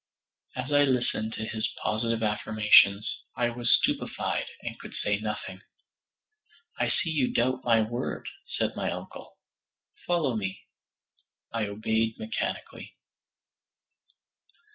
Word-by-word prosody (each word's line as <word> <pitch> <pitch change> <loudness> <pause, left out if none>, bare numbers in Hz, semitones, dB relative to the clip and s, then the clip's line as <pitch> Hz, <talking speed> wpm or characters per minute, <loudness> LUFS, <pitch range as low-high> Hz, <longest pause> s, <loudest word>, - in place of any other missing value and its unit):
As 130 +3 -4
I 145 0 +6
listened 120 -4 0
to 110 - -4
his 110 0 -2
positive 115 +1 0
affirmations, 105 -1 +5 0.3
I 120 -1 +1
was 120 0 -3
stupefied - - +1 0.2
and - - -5
could - - -9
say 105 0 0
nothing. 105 -3 -4 1.2
"I - - +2
see 165 - -1
you 140 -5 +1
doubt 130 +2 +1
my 115 -2 +5
word," 120 +4 -3 0.3
said - - 0
my - - -1
uncle; - - -7 0.7
"follow 165 -8 +2
me." 95 -3 -3 0.9
I 115 -2 0
obeyed 110 +2 0
mechanically. 225 0 -4
115 Hz, 115 wpm, -28 LUFS, 105-125 Hz, 1.2 s, I